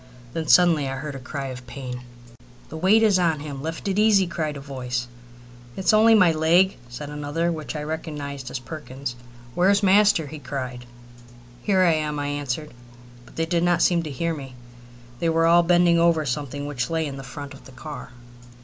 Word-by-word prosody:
Then 160 Hz, -1 st, -3 dB
suddenly 165 Hz, -6 st, +5 dB
I 135 Hz, -, -3 dB
heard 150 Hz, +1 st, -5 dB
a 135 Hz, -, -7 dB
cry 135 Hz, +1 st, -5 dB
of 125 Hz, -1 st, -9 dB
pain. 125 Hz, -1 st, -7 dB, 0.7 s
"The -, -, -8 dB
weight 190 Hz, +7 st, +4 dB
is 205 Hz, -4 st, +4 dB
on 165 Hz, -4 st, +1 dB
him. 145 Hz, -2 st, -6 dB
Lift 160 Hz, +5 st, -5 dB
it 195 Hz, +1 st, 0 dB
easy," 210 Hz, -3 st, +5 dB
cried 155 Hz, -4 st, -3 dB
a -, -, -7 dB
voice. 125 Hz, -3 st, -4 dB, 0.7 s
"It's 190 Hz, -, +2 dB
only 225 Hz, +1 st, +6 dB
my 180 Hz, -5 st, +6 dB
leg!" 170 Hz, +4 st, +3 dB
said 145 Hz, +4 st, -7 dB
another 150 Hz, +4 st, -2 dB
one, -, -, -1 dB
which 155 Hz, -1 st, -6 dB
I 150 Hz, -, -3 dB
recognized 145 Hz, -4 st, -5 dB
as -, -, -4 dB
Perkins's. 135 Hz, -2 st, -7 dB, 0.4 s
"Where's 200 Hz, +5 st, +3 dB
master?" 200 Hz, -4 st, +4 dB
he 150 Hz, +2 st, -8 dB
cried. 130 Hz, -3 st, -6 dB, 0.7 s
"Here 190 Hz, +2 st, +3 dB
I 170 Hz, -2 st, +4 dB
am," 150 Hz, -1 st, -1 dB
I 145 Hz, 0 st, -2 dB
answered, 145 Hz, +1 st, -3 dB, 0.6 s
but -, -, -17 dB
they 165 Hz, -, 0 dB
did 170 Hz, 0 st, 0 dB
not 175 Hz, 0 st, +3 dB
seem 175 Hz, -2 st, +3 dB
to 160 Hz, -, -6 dB
hear 165 Hz, +5 st, -2 dB
me. 135 Hz, -4 st, -8 dB, 0.6 s
They 165 Hz, -, +1 dB
were 165 Hz, 0 st, +2 dB
all 170 Hz, +1 st, +6 dB
bending 175 Hz, 0 st, +4 dB
over 165 Hz, -2 st, +3 dB
something 145 Hz, +1 st, -3 dB
which 130 Hz, -4 st, -3 dB
lay 165 Hz, -1 st, 0 dB
in 135 Hz, -2 st, -6 dB
front 140 Hz, +2 st, -8 dB
of 135 Hz, -, -15 dB
the 135 Hz, -, -13 dB
car. 145 Hz, +3 st, -8 dB
155 Hz, 195 wpm, -24 LUFS, 140-170 Hz, 0.7 s, only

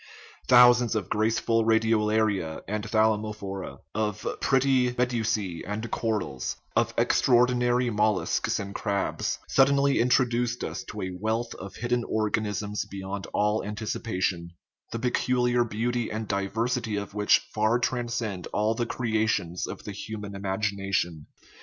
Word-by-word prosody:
Thousands 125 Hz, -2 st, +6 dB
of 100 Hz, -3 st, -3 dB
graceful 115 Hz, +1 st, +2 dB
radiolaria 110 Hz, -6 st, +1 dB
and 105 Hz, +1 st, -2 dB
thalamophora, 110 Hz, -3 st, -1 dB
of 105 Hz, -1 st, -2 dB
pretty 130 Hz, -2 st, +3 dB
medusae 115 Hz, -8 st, -1 dB
and 105 Hz, +3 st, -4 dB
corals, 105 Hz, -, -2 dB, 0.2 s
of -, -, +2 dB
extraordinary 125 Hz, 0 st, +3 dB
mol 105 Hz, -1 st, +2 dB
luscs, -, -, -1 dB
and 100 Hz, 0 st, -5 dB
crabs, 100 Hz, -2 st, -1 dB
suddenly 140 Hz, +1 st, +4 dB
introduced 120 Hz, -1 st, +2 dB
us -, -, -4 dB
to -, -, -6 dB
a 95 Hz, -, -3 dB
wealth 115 Hz, +3 st, -1 dB
of 95 Hz, 0 st, -9 dB
hidden 120 Hz, 0 st, -1 dB
organisms 105 Hz, -1 st, -1 dB
beyond 95 Hz, 0 st, -5 dB
all 105 Hz, +1 st, +1 dB
anticipation, 100 Hz, -4 st, -2 dB, 0.4 s
the -, -, -3 dB
pe 125 Hz, +2 st, 0 dB
culiar 125 Hz, -2 st, +1 dB
beauty 120 Hz, +2 st, -1 dB
and 110 Hz, 0 st, -4 dB
diversity 110 Hz, +4 st, -1 dB
of 100 Hz, -1 st, -4 dB
which 105 Hz, 0 st, +4 dB, 0.2 s
far 110 Hz, +2 st, +2 dB
transcend 120 Hz, -6 st, -2 dB
all 105 Hz, +1 st, 0 dB
the 120 Hz, +1 st, -2 dB
creations 110 Hz, -8 st, -1 dB
of -, -, -7 dB
the -, -, -6 dB
human 105 Hz, 0 st, -6 dB
imagination. 95 Hz, -4 st, -2 dB
110 Hz, 130 wpm, -27 LUFS, 100-120 Hz, 0.4 s, Thousands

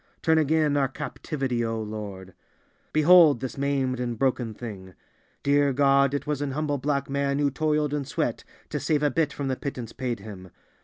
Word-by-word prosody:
Turn 160 Hz, 0 st, +4 dB
again 155 Hz, -1 st, +2 dB
our 135 Hz, -1 st, +2 dB
captivity, 135 Hz, -2 st, -3 dB
O 115 Hz, -1 st, -2 dB
Lord! 105 Hz, -4 st, -7 dB, 0.6 s
Behold 155 Hz, -3 st, +6 dB
this 130 Hz, -1 st, -5 dB
maimed 135 Hz, -2 st, -1 dB
and 120 Hz, -2 st, -3 dB
broken 125 Hz, -4 st, 0 dB
thing; 95 Hz, -6 st, -8 dB, 0.5 s
dear 140 Hz, 0 st, +3 dB
God, 140 Hz, 0 st, +3 dB
it 140 Hz, -, -3 dB
was 150 Hz, -2 st, -2 dB
an 140 Hz, -2 st, -2 dB
humble 145 Hz, -1 st, -1 dB
black 140 Hz, 0 st, -1 dB
man 140 Hz, 0 st, 0 dB
who 145 Hz, -1 st, +1 dB
toiled 150 Hz, +1 st, 0 dB
and 145 Hz, -2 st, -2 dB
sweat -, -, -2 dB, 0.3 s
to -, -, -2 dB
save 150 Hz, -2 st, 0 dB
a 145 Hz, -, +3 dB
bit 160 Hz, -3 st, +1 dB
from 140 Hz, -2 st, -4 dB
the 130 Hz, -, 0 dB
pittance 125 Hz, -4 st, -6 dB
paid 125 Hz, -4 st, -3 dB
him. 95 Hz, -3 st, -10 dB
140 Hz, 185 wpm, -26 LUFS, 120-145 Hz, 0.6 s, Behold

